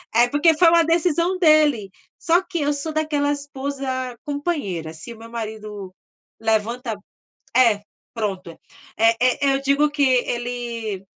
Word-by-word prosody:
É 240 +1 +5
porque 300 +4 +3
foi 340 0 +6
uma 335 0 +5
decisão 340 +2 +1
dele. 305 - +4 0.3
Só 340 +1 +3
que 375 -2 -5
eu 290 0 +1
sou 290 +2 -4
daquela 300 -2 0
esposa 270 -3 -4
companheira 285 - -3
se 165 +9 -9
o - - -15
meu 225 +1 -12
marido 215 -4 -6 0.5
levanta, 225 +2 -1 0.6
eh, 230 -5 +4 0.3
pronto, 195 -6 -3 0.5
eh 225 +1 +4
eh, 250 0 +3
eu 270 - 0
digo 280 +2 +2
que 290 -1 -1
ele, 240 -5 -1
260 Hz, 140 wpm, -22 LUFS, 225-300 Hz, 0.6 s, foi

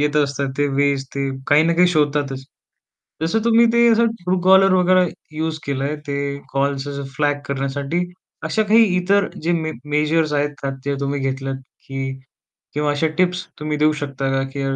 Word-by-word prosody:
येत 150 0 +1
असतात. 140 -1 0
ते 145 - +3
वेज 140 -1 +1
ते 140 0 -1 0.2
काही 145 +2 +5
ना 165 +1 +2
काही 180 +2 +5
शोधतातच. 145 -4 0 0.8
जसं 165 +7 +1
तुम्ही 235 0 +5
ते 235 0 +5
असं 230 +1 +4 0.2
ट्रू-कॉलर 185 +1 +4
वगैरे 185 0 +4 0.3
युज 160 0 -2
केलंय, 140 +1 -1
ते 140 - -2 0.4
कॉल्स 140 0 0
जसं 140 0 -5
फ्लॅग 145 0 +1
करण्यासाठी, 140 +4 -2 0.5
अशा 160 +8 +1
काही 220 +2 +5
इतर 200 +3 +2 0.2
जे 170 - +1
मे 160 -2 -1 0.2
मेजर्स 150 +1 +1
आहेत 145 -1 -1 0.2
जे 140 - -1
तुम्ही 140 0 -2
घेतलात, 135 0 -2 0.3
की. 135 0 -4 0.5
किंवा 150 0 0
अशा 145 +2 +1
टिप्स 180 0 +1
तुम्ही 150 0 -2
देऊ 155 +1 +4
शकता 140 -1 -3
का? 135 0 +1
की 140 - -4
150 Hz, 165 wpm, -20 LUFS, 140-175 Hz, 0.8 s, काही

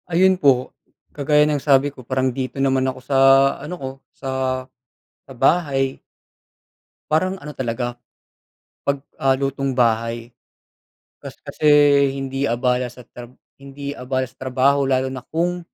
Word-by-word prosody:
Ayun 185 +2 +3
po. 130 -3 +3 0.4
Kagaya 150 +1 +2
ng 150 -2 0
sabi 140 0 +3
ko 130 -3 -15
parang 130 0 0
dito 130 +1 -5
naman 130 -1 +2
ako 130 0 -3
sa 135 +1 0 0.4
ano 150 +5 -6
ko, 135 -5 -5 0.3
sa 135 - -6 1.0
sa 135 - -12
bahay, 135 -1 +1 1.1
parang 185 +5 0
ano 150 -4 -9
talaga, 120 -2 -3 0.9
'pag, 140 0 0 0.2
ah, 135 0 +2
lutong 135 0 -1
bahay. 115 -1 0 0.9
Kas - - -11
kasi 155 - -4 0.5
hindi 135 0 -3
abala 125 0 0
sa 125 - -13
trab 120 +1 -12 0.3
hindi 140 +1 -7
abala 130 +1 -2
sa - - -26
trabaho 130 +2 +2
lalo 130 0 +1
na 130 - -6
kung 175 +2 0
135 Hz, 135 wpm, -21 LUFS, 130-145 Hz, 1.1 s, Ayun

